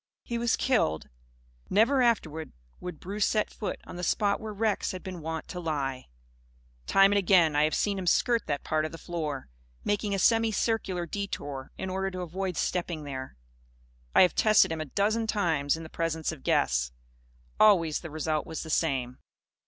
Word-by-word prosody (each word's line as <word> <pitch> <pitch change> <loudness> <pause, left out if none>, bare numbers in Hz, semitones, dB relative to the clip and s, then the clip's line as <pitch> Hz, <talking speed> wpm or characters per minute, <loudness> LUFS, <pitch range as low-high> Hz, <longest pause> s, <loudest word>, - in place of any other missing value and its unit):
He 235 -1 -3
was 235 -1 +2
killed. 80 - +1 0.6
Never 240 +7 +4
afterward 160 -10 0 0.3
would 180 -4 -7
Bruce 200 +3 -1
set 215 -1 0
foot 210 - -4
on - - -9
the 180 - -5
spot 200 +3 +1
where 220 -1 -6
Rex 210 -1 0
had 185 - -7
been 185 -3 -6
wont 160 0 -4
to 180 - -5
lie. 140 -6 -3 0.8
Time 195 0 +6
and 205 - +4
again 175 -5 +4
I 150 +1 +4
have 155 - 0
seen 200 -2 0
him 180 - -5
skirt 235 +6 +2
that 145 -1 -2
part 155 0 0
of 155 - -3
the 165 - -8
floor, 155 -6 -4 0.4
making 205 0 0
a - - -1
semi 225 +3 +3
circular 195 -5 -1
detour 145 -8 -5
in 190 0 -4
order 190 +1 -1
to 185 -1 -6
avoid 180 +1 -3
stepping 170 -3 -2
there. 130 - -7 0.8
I - - +9
have 180 - +3
tested 215 -5 +4
him 160 -1 -2
a - - -3
dozen 215 +8 0
times, 160 -9 +1
in 165 - -8
the - - -8
presence 160 -1 -2
of - - -9
guests. - - +1 0.7
Always 175 -8 +5
the 165 - -8
result 155 0 -2
was 160 - -5
the 160 - -6
same. 130 -6 0
175 Hz, 185 wpm, -28 LUFS, 155-205 Hz, 0.8 s, I